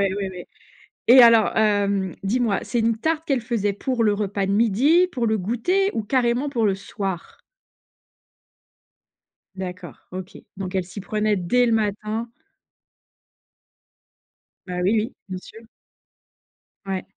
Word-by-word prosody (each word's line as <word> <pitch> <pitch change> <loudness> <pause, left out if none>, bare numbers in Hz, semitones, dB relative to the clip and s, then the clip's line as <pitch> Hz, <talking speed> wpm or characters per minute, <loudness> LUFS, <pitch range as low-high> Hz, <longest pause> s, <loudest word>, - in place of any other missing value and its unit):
ouais, 200 -1 -3
ouais 180 -1 -9 0.6
et 250 +1 +9
alors, 230 -2 +6
heu, 200 -3 +1
dis-moi, 220 +1 0
c'est 240 - -2
une 225 0 +1
tarte 320 +6 -1
qu'elle 270 -3 +1
faisait 225 -4 -1
pour 235 +3 -1
le 210 - +3
repas 200 -1 -2
de 195 - 0
midi? 245 - +3
Pour 245 -8 -1
le 220 -1 +1
goûter? 245 - 0
Ou 220 - -3
carrément 245 +3 +1
pour 235 -6 0
le 195 -2 +1
soir? 195 -2 -6 2.2
D'accord, 185 -1 -7
OK. 185 +2 -7 0.2
Donc 190 -1 -5
elle 190 - +1
s'y 190 +3 -8
prenait 210 +1 0
dès 200 +7 +2
le 235 - +1
matin 215 +1 -2 2.4
Bah 180 0 -4
oui, 195 +4 +3
oui, 225 +5 -4
bien 185 -1 -5
sûr. 220 +4 -14 1.2
Ouais. 190 -1 -3
215 Hz, 135 wpm, -23 LUFS, 195-235 Hz, 2.4 s, et